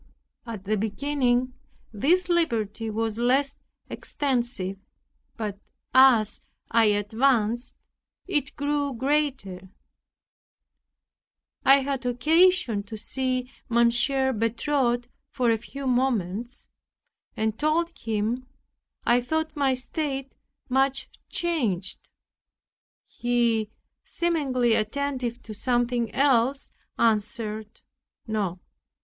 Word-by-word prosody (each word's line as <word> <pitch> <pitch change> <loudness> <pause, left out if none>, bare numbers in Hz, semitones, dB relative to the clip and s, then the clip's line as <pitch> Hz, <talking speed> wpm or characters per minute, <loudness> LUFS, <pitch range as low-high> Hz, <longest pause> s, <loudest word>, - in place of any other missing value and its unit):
At 220 -5 -6
the 215 +2 0
beginning, 250 +3 0 0.4
this 345 - +2
liberty 230 - 0
was 220 0 -2
less 270 +4 +2 0.3
extensive; 240 -9 -2 0.6
but 210 -3 -4 0.3
as 245 -5 +5 0.3
I 230 -1 +5
advanced 220 +3 +1 0.5
it 295 -7 0
grew 285 -1 -1
greater. 260 -9 -1 1.9
I 275 +1 +7
had 270 -1 -2
occasion 315 - +3
to 210 +2 -8
see 255 +2 -2 0.2
Mon. 235 0 +4 0.2
Bertot 245 -1 0 0.2
for 245 -3 +1
a 225 - +2
few 275 +4 -8
moments, 245 -3 -1 0.7
and 220 0 -1
told 330 +3 +1
him, 225 +3 -2 0.6
I 240 +1 +4
thought 315 +5 -2
my 275 -3 +2
state 270 0 -4 0.3
much 270 +1 +1 0.2
changed. 230 - -2 1.0
He, 235 -3 0 0.3
seemingly 270 -9 +1
attentive 250 +2 -2
to 220 - -8
something 240 +1 0
else, 270 0 +2 0.3
answered, 220 -1 0 0.4
"No." 200 -5 -2
245 Hz, 90 wpm, -26 LUFS, 220-275 Hz, 1.9 s, I